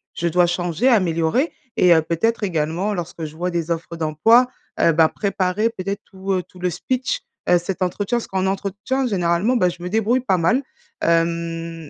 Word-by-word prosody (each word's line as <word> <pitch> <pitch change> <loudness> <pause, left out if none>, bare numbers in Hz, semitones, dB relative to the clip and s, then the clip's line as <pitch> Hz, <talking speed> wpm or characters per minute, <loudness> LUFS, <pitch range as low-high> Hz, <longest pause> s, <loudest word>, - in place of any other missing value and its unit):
je 170 - -1
dois 175 +1 +3
changer, 175 +5 0
améliorer. 185 - +2 0.3
Et 180 -1 +6
heu, 160 - +4
peut-être 210 +9 0
également 175 +2 -1
lorsque 170 -2 -5
je 155 0 -9
vois 180 +2 -2
des 170 -1 -2
offres 170 0 -3
d'emploi, 165 +11 +4 0.3
heu, 165 - +5
ben, 160 0 +4
préparer 200 +1 0
peut-être 200 -1 -5
tout, 190 0 -6
heu, 185 -1 0
tout 180 - -18
le 180 0 0
speech, 250 +9 -2 0.3
heu, 180 - +6
cet 175 +2 -4
entretien. 200 +5 0
Parce 235 - -4
qu'en 190 0 -1
entretien 200 +7 -2
généralement, 185 +3 +1
bah 180 -5 +3
je 175 0 -9
me 180 - -3
débrouille 225 +5 +2
pas 195 -7 +1
mal 235 +11 +2 0.4
hem 165 -1 -1
180 Hz, 185 wpm, -21 LUFS, 170-205 Hz, 0.4 s, Et